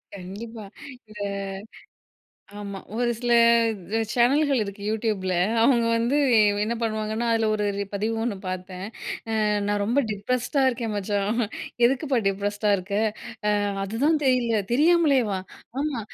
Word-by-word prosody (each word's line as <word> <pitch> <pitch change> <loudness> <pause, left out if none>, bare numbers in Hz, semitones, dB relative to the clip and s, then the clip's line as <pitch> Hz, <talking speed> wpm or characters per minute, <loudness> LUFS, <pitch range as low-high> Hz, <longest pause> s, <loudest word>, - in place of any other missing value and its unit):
கண்டிப்பா. 205 +4 -8 0.4
இந்த 210 -1 -11 1.4
ஆமா 200 -1 -6 0.2
ஒரு 240 0 +1
சில 240 -1 +1 0.8
சேனல்கள் 275 +2 +3
இருக்கு. 200 0 -8
Youtubeல 210 -4 -1 0.3
அவங்க 235 -1 +4
வந்து 240 +5 +1 0.5
என்ன 230 +2 -1
பண்ணுவாங்கன்னா, 220 +1 -1
அதில 225 -1 +2
ஒரு 210 -1 0 0.3
பதிவு 215 +3 -1
ஒண்ணு 230 -4 -1
பார்த்தேன். 185 0 -5 0.8
"நான் 205 0 0
ரொம்ப 240 +7 +2
டிப்ரஸ்ட்டா 245 +6 -1
இருக்கேன் 230 -3 -3
மச்சான்." 205 +2 -1 0.5
எதுக்குப்பா 270 +1 +1
டிப்ரஸ்ட்டா 205 +1 0
இருக்க? 190 +2 -7 0.9
"அதுதான் 270 +11 +1
தெரியல" 240 -4 +2
தெரியாமலேவா. 280 - +3 0.4
"ஆமா 290 -5 -1
225 Hz, 110 wpm, -25 LUFS, 205-245 Hz, 1.4 s, அவங்க